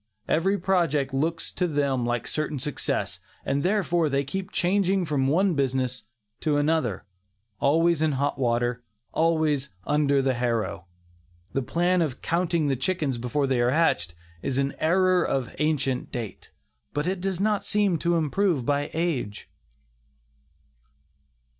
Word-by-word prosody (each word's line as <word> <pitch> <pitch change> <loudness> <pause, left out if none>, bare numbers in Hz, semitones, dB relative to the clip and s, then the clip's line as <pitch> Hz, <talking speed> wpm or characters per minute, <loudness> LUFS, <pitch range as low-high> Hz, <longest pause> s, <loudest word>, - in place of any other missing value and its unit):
Every 190 +5 +2
project 165 -8 +1
looks 160 +5 -1
to 180 - 0
them 140 -5 0
like 120 -1 -1
certain 155 +1 -2
success, 140 +2 -2 0.3
and 140 - 0
therefore 175 -3 +1
they 140 0 +1
keep 185 +7 -5
changing 190 0 +1
from 140 -4 0
one 180 +6 +3
business 130 -4 -1 0.3
to 150 -2 +1
another, 145 - 0 0.5
always 165 +3 +3
in 155 -2 +2
hot 140 +1 -1
water, 120 -1 0 0.3
always 155 -4 +1 0.2
"under 140 -2 +2
the 135 -1 +2
harrow." 115 -7 -2 0.7
The 135 - +1
plan 175 +7 +1
of 145 -6 -1
"counting 170 -2 0
the 135 - +1
chickens 140 -2 -1
before 135 +4 0
they 130 -2 +1
are 120 - +3
hatched" 125 - +1 0.3
is 135 - -2
an 140 0 0
error 185 +2 +3
of 130 -3 -2
ancient 145 -4 0
date, 115 -5 -6 0.4
but 145 +1 0
it 185 0 -1
does 190 -2 -2
not 210 0 +1
seem 205 -5 +1
to 170 +2 +1
improve 165 -3 +1
by 145 +1 0
age. 155 -11 -2
150 Hz, 140 wpm, -26 LUFS, 130-175 Hz, 0.7 s, one